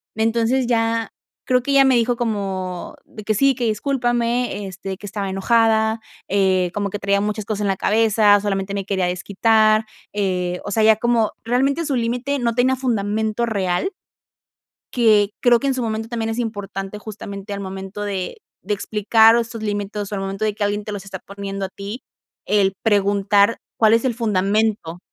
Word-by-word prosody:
entonces, 230 +3 +1
ya 230 -1 0 0.4
creo 250 0 +2
que 280 - -2
ella 275 0 +6
me 265 -1 +4
dijo, 240 +1 +2
como 195 -6 -3
de 215 - -11
que: 215 - 0
"Sí, 275 +6 +3
que 245 -1 -2
discúlpame, 240 -1 0
este, 190 0 -6
que 205 - -11
estaba 200 -1 -4
enojada, 220 +2 +2 0.3
eh, 190 -2 +2
como 205 -1 -2
que 205 - -5
traía 200 0 +1
muchas 210 0 -2
cosas 210 -1 -3
en 205 - 0
la 195 - +1
cabeza, 210 -1 +4
solamente 195 -1 -2
me 200 -1 -3
quería 190 -2 0
desquitar", 215 +4 +2 0.3
eh, 180 -3 -1
o 205 - -4
sea, 220 +2 +2
ya 220 0 +6
como 230 -1 +1
realmente 270 +7 +1
su 285 -3 -1
límite 250 +4 -1
no 235 -2 0
tenía 255 +2 +3
fundamento 220 -2 -1
real 200 - -1 1.0
que 215 -4 +4
creo 240 -1 +5
que 275 - -2
en 270 - +1
su 255 - -2
momento 220 -1 -3
también 225 -1 -2
es 225 - -4
importante 205 -3 -4
justamente 205 -1 -8
al 200 - -4
momento 195 +1 -6
de 195 -3 -4 0.2
de 210 +2 -1
explicar 220 +2 +4
estos 230 -1 -3
límites, 205 0 -3
o - - -6
sea, 205 - -5
al 195 - -3
momento 195 +2 -3
de 215 - +1
que 210 - -2
alguien 205 +1 -1
te 210 - -6
los 205 -2 -6
está 190 -1 -8
poniendo 200 0 -5
a - - -11
ti, 200 +6 -8 0.4
el 200 -2 +2
preguntar, 205 0 +3 0.2
cuál 220 -1 +5
es 230 - +2
el 260 - +2
fundamento. 210 -4 0
210 Hz, 185 wpm, -21 LUFS, 200-230 Hz, 1.0 s, ella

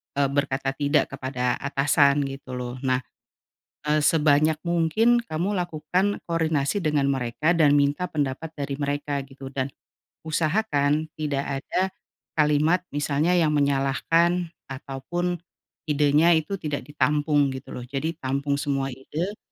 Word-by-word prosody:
eee, 140 -1 +2
berkata 135 -1 0
tidak 145 +2 +1
kepada 130 -2 -2
atasan 140 0 +3
gitu 135 -2 -6
loh. 125 0 -5
Nah, 130 0 +1 0.9
eee, 155 - +4
sebanyak 150 0 +3
mungkin 175 +8 +3
kamu 185 +5 -1
lakukan 180 +4 -1
koordinasi 160 -1 0
dengan 150 -6 +1
mereka 135 +4 0
dan 155 -4 +4
minta 145 +5 +2
pendapat 150 0 -3
dari 140 -2 -4
mereka 145 0 -2
gitu, 135 0 -10
dan 135 0 -3 0.5
usahakan 155 -2 +1
tidak 140 -2 -2
ada 190 +5 -1 0.4
kalimat, 150 +3 +3
misalnya 145 +4 +1
yang 160 -3 +3
menyalahkan 150 +5 +2 0.2
ataupun 140 +7 -4 0.5
idenya 150 +3 +4
itu 160 +5 0
tidak 150 -5 -3
ditampung 145 0 +1
gitu 130 +1 -8
loh. 125 - -7
Jadi 145 +5 -3
tampung 140 0 -1
semua 135 -1 -1
ide, 155 +10 -5
145 Hz, 125 wpm, -25 LUFS, 140-160 Hz, 0.9 s, eee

